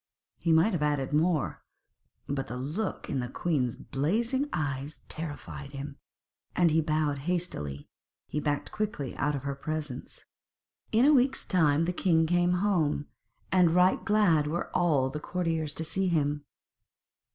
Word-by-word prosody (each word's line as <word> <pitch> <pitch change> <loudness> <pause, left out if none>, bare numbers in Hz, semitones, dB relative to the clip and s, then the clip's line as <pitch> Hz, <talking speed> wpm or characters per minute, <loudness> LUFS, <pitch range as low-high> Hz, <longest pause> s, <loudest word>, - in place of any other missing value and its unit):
He 165 - +1
might 160 +7 +4
have 170 - -1
added 145 -2 0
more, 155 -1 +1 0.7
but 135 -1 -2
the 125 - -5
look 155 +11 -3
in 135 - -1
the 125 - -2
queen's 130 -6 0
blazing 230 - -1
eyes 140 -1 -3
terrified 145 -3 -7
him, 140 +1 -6 0.6
and, 160 -2 +4
bowing 155 -2 +1
hastily, 135 - -3 0.4
he 150 - -2
backed 145 -1 -1
quickly 210 -11 -3
out 145 +2 +1
of 135 - -5
her 140 0 -2
presence. 150 -1 -5 0.7
In 230 +4 +4
a 300 - +6
week's 265 0 +3
time 160 -5 +3
the 180 - -1
king 165 -3 +3
came 175 +1 +2
home, 155 -7 +1 0.4
and 180 -3 +4
right 180 +1 +4
glad 180 -8 +3
were 170 +3 -3
all 145 -7 +2
the 150 - -4
courtiers 160 -3 -2
to 160 - -2
see 190 +4 -1
him. 145 -3 0
155 Hz, 150 wpm, -29 LUFS, 145-180 Hz, 0.7 s, a